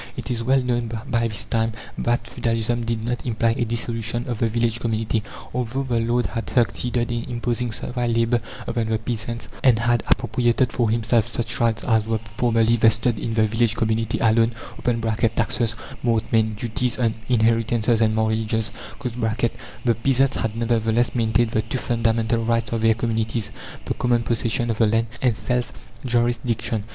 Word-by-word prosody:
It - - -4
is 115 -1 -1
well 130 +2 +3
known 120 -2 -1 0.2
by 115 -1 +2
this 105 -2 -1
time 115 0 0 0.2
that 120 0 0
feudalism 115 +1 -1
did 115 -1 -2
not 120 +1 -2
imply 115 -2 +1
a 120 - 0
dissolution 115 +1 -2
of 120 -3 -3
the 115 - +2
village 115 +1 0
community. 115 -1 -1 0.3
Although 125 +2 -1
the 120 -3 0
lord 120 +1 +1
had 115 - -4
succeeded 120 0 +1
in 120 -1 -2
imposing 120 0 -1
servile 120 +1 -2
labour 115 +1 +2 0.2
upon 115 -1 -1
the 110 - +2
peasants, 115 +1 -4 0.2
and 125 -4 +6
had 120 0 +2
appropriated 120 +1 +2
for 120 -3 +1
himself 115 0 +2
such 120 0 -3
rights 115 -2 +1
as 110 -2 +2
were 115 0 +1 0.2
formerly 115 -1 +3
vested 115 0 +3
in 115 +2 -3
the 110 -1 +4
village 115 +1 +1
community 110 -1 0
alone 115 +1 +3 0.8
(taxes, 115 -2 0 0.3
mortmain, 110 -2 +1
duties 120 +2 -1
on 115 -3 +1 0.2
inheritances 115 0 +2
and 110 -1 +3
marriages), 110 0 0 0.3
the 120 0 -2
peasants 135 0 +3
had, 110 -1 -2
nevertheless, 115 0 +1
maintained 115 -1 +2
the 110 - +1
two 115 +4 -4
fundamental 115 -1 +1
rights 115 -1 0
of 115 -1 -1
their 115 0 +4
communities: 115 -1 -1 0.3
the - - -1
common 120 -1 +1
possession 115 0 0
of 110 - -4
the 115 - +5
land, 115 +2 +2 0.2
and 125 -4 +2
self 125 +2 -1 0.3
jurisdiction. 120 -3 0
115 Hz, 165 wpm, -23 LUFS, 110-120 Hz, 0.8 s, and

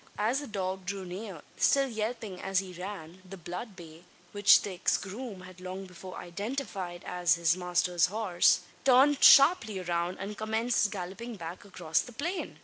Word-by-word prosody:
As 225 +6 +1
the 290 - -7
dog 190 -2 -4
drew 195 -1 -4
near, 185 -2 -7
still 275 -1 +3
yelping 220 -4 -4
as 195 0 -2
he 185 -1 -1
ran, 180 -1 -8
the 190 +1 -10
blood 180 +5 -7
bay 165 -2 -13 0.3
which 205 0 +6
the 200 - -4
ex 180 - +1
groom 205 0 -7
had 185 0 -13
long 185 +1 -6
before 185 0 -10
identified 195 -2 -5
as 180 -1 +2
his 170 0 +2
master's 180 -1 +1
horse 195 -3 +2 0.2
turned 270 +2 +5
sharply 275 - +7
round, 175 0 -2
and 205 +2 -5
commenced 220 0 +1
galloping 200 +5 -6
back 170 +1 -8
across 175 -5 -1
the 245 - -11
plain! 340 +10 -4
190 Hz, 165 wpm, -29 LUFS, 180-220 Hz, 0.3 s, sharply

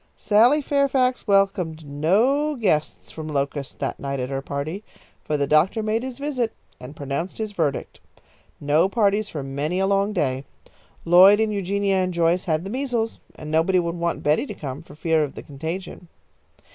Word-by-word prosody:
'" - - -41
Sally 245 +8 +5
Fairfax 270 -3 +1
welcomed 195 -6 +1
no 220 - +1
guests 185 - -1
from 155 -1 -7
Locust 140 -1 -3
that 135 - -3
night 140 -1 -3
at 125 +1 -3
her 135 0 -2
party, 145 +8 -5 0.4
for 150 - -1
the 140 - +1
doctor 160 +10 +2
made 220 +1 0
his 255 -1 -6
visit 275 -5 -2 0.3
and 130 +4 -10
pronounced 140 +6 -4
his 220 -1 -3
verdict. 155 -8 -2 0.6
No 150 +5 +2
parties 205 -1 +1
for 150 -3 -5
many 140 +6 -2
a 190 - +2
long 200 +1 +1
day. 135 -9 -1 0.6
Lloyd 185 +4 +7
and 220 -1 +1
Eugenia 200 0 0
and 185 -1 -1
Joyce 170 +2 +2
had 160 -2 0
the 195 - -6
measles, 245 -3 -2 0.2
and 155 0 -8
nobody 165 +4 +3
would 170 -1 0
want 170 0 -2
Betty 150 - +2
to - - -7
come 140 0 -6
for 155 -3 -15
fear 160 0 +1
of 145 - -5
the - - -8
contagion. 165 +5 -6
175 Hz, 180 wpm, -23 LUFS, 150-210 Hz, 0.6 s, Lloyd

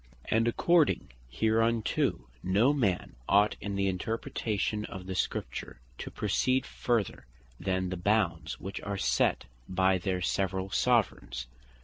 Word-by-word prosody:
And 115 +1 +3
according 160 - +3 0.2
hereunto, 110 - +1
no 105 +10 +3
man 100 - 0
ought 105 +1 +4
in 100 -1 -3
the 100 0 +1
interpretation 105 +2 -2
of 95 -1 -8
the 95 - -4
Scripture 75 - -3 0.2
to - - -5
proceed 130 0 +1
further 115 - -1 0.3
then 95 0 -1
the 95 - -3
bounds 90 -3 0
which 95 +2 -6
are 100 -1 -3
set - - +1 0.2
by 95 0 +3
their 95 0 -1
severall 95 +1 -1
Soveraigns. 110 - +1
100 Hz, 125 wpm, -30 LUFS, 95-115 Hz, 0.3 s, ought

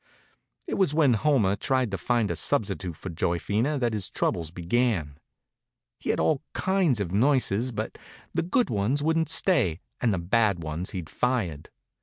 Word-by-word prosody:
It - - -3
was 180 -7 +2
when 150 -6 +4
Homer 110 -5 +2
tried 130 +2 0
to 95 - -2
find 115 +2 +1
a - - -2
substitute 95 - -1
for 95 - -7
Joyphena 100 - 0
that 120 -3 0
his 100 -4 -3
troubles 80 -2 -1
began. 85 - -1 0.8
He'd - - -6
had - - +1
all 150 -4 +2
kinds 185 - +1
of 95 -4 -2
nurses, 125 0 +2
but 110 - -5 0.3
the - - +1
good 240 +9 +1
ones 115 +8 0
wouldn't 160 0 +1
stay 95 - +2 0.2
and 120 - +2
the 95 - 0
bad 100 0 +1
ones 80 +4 -3
he'd 90 -5 -5
fired. 105 - -1
110 Hz, 165 wpm, -26 LUFS, 90-135 Hz, 0.8 s, when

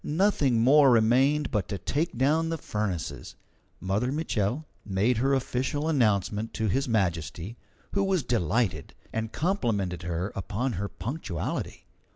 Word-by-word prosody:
Nothing 150 - +2
more 140 +2 +7
remained 130 +6 +3
but 105 -6 0
to 100 - -2
take 145 - -2
down 155 +6 +2
the 165 - -1
furnaces. 105 - -4 0.4
Mother 105 +7 0
Mitchel 140 -2 -1 0.2
made 105 +4 +1
her 135 +4 +2
official 130 +3 -1
announcement 110 - +1
to 110 - -1
His 135 +6 0
Majesty, 90 -1 -1 0.4
who 200 - +1
was 190 -5 +1
delighted, 110 - 0 0.2
and 110 0 -2
complimented 115 - -1
her 90 +2 -3
upon 105 +7 -2
her 100 +2 -2
punctuality. 105 - -4
115 Hz, 135 wpm, -27 LUFS, 100-140 Hz, 0.4 s, more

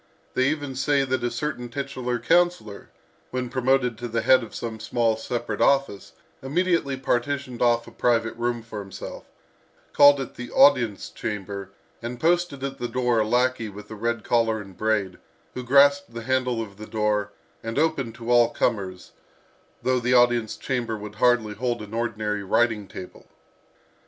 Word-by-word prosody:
They 130 +1 +2
even 145 -3 -3
say 140 +2 +1
that 130 -2 -1
a 120 - +1
certain 125 0 -4
titular 130 -2 -3
councillor, 170 - +1 0.4
when 125 -1 -3
promoted 130 -2 +1
to 120 - -4
the 115 0 -2
head 130 0 +6
of 115 - -9
some 115 -2 -5
small 115 0 +1
separate 115 -1 -4
office, 140 -8 +1 0.3
immediately 155 -1 0
partitioned 130 0 -2
off 120 -1 +3
a - - -12
private 115 -2 +1
room 120 0 -2
for 110 -2 -7
himself, 95 -1 -8 0.7
called 145 0 +7
it 135 - -5
the 125 0 -8
audience 120 -7 +4
chamber, 100 -1 -5 0.3
and 120 +1 -6
posted 170 -4 +1
at 135 0 -4
the 120 - -2
door 125 -2 +1
a 110 - +1
lackey 125 -1 +1
with 105 +1 -11
red 115 +1 -2
collar 115 -2 +1
and 100 -3 -11
braid, 105 -4 -1 0.3
who 125 - -5
grasped 140 +1 +4
the 115 - -5
handle 125 -2 0
of 100 -2 -12
the 110 0 -9
door, 105 -1 0 0.3
and 115 +2 -5
opened 140 -7 0
to 115 0 -4
all 120 -1 +5
comers, 95 -6 -2 0.7
though 130 0 +2
the 125 +1 +2
audience 120 -3 +3
chamber 120 -4 -2
would 105 0 -8
hardly 120 -4 +3
hold 120 +2 -2
an 105 +1 -11
ordinary 110 -3 -2
writing 110 0 +1
table. 95 -1 -10
120 Hz, 165 wpm, -24 LUFS, 110-130 Hz, 0.7 s, called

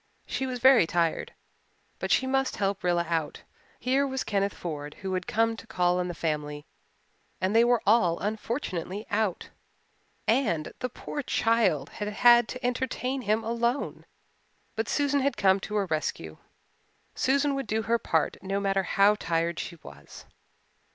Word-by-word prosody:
She 265 - -3
was 255 -1 -3
very 255 -7 +6
tired 170 -1 -1 0.6
but - - -3
she 260 - +3
must 270 0 0
help 195 -1 -1
Rilla 175 -1 +1
out. 165 -2 -2 0.4
Here 270 +2 +1
was 265 -1 -2
Kenneth 200 -1 -1
Ford 150 -3 -6
who 190 -1 -2
had 185 0 -2
come 225 +1 +1
to - - -12
call 180 0 +1
on 180 - -1
the 175 - -5
family 150 -2 -3 0.7
and 190 +3 0
they 230 - +7
were 240 -1 +2
all 195 -6 +4
unfortunately 210 - -3
out, 205 -3 -1 0.8
and 170 - +1
"the 250 - -2
poor 290 +4 -6
child" 225 - +1
had 210 - -5
had 240 +2 +5
to 255 -1 -6
entertain 255 +1 -1
him 220 -1 0
alone. 235 +3 -2 0.7
But 225 +1 -2
Susan 285 -1 +1
had 280 +1 0
come 190 0 +4
to 210 +2 -6
her 205 -2 +1
rescue 155 - -3 0.8
Susan 280 +2 +1
would 275 -3 -3
do 220 +2 -1
her 230 +1 +1
part 160 -7 0
no 195 +1 -2
matter 195 -1 +1
how 200 +2 +4
tired 170 -4 -1
she 175 - -5
was. 70 +1 -12
210 Hz, 160 wpm, -27 LUFS, 175-245 Hz, 0.8 s, they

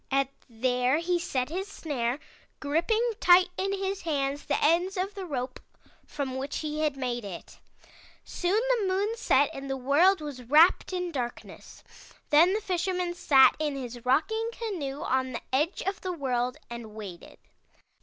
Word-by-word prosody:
And 275 0 +2 0.2
there 250 +3 +1
he 350 +1 0
set 260 -7 -2
his 375 +5 -3
snare, 270 -10 -2 0.4
gripping 345 +11 +1
tight 360 -1 +6
in 390 +2 -1
his 390 0 -2
hands 285 -3 -1
the - - 0
ends 350 +5 +2
of 380 +3 -2
the 390 -2 -6
rope 255 -4 -4 0.5
from 265 -3 -4
which 275 +2 -4
he 305 -1 -3
had 300 -3 0
made 245 -3 -2
it. 190 -4 -9 0.6
"Soon 365 +4 0 0.2
the 400 - 0
moon 405 +4 0
set 290 - +3
and 275 0 -7
the 270 - -2
world 300 +9 +4
was 290 -4 -7
wrapped 305 +12 +4
in 360 -1 -2
darkness. 245 -5 -7 0.5
Then 330 +5 +6
the 430 - -1
Fisherman 360 -2 -1
sat 275 -6 +5
in 300 -2 -1
his 245 -3 -7
rocking 440 - +1
canoe 325 -13 -4
on 260 0 0
the 235 - -4
edge 305 +7 +1
of 390 +1 -3
the 370 -1 -3
world 250 -5 -1
and 235 -3 -8
waited. 195 -5 -9
300 Hz, 165 wpm, -28 LUFS, 260-365 Hz, 0.6 s, tight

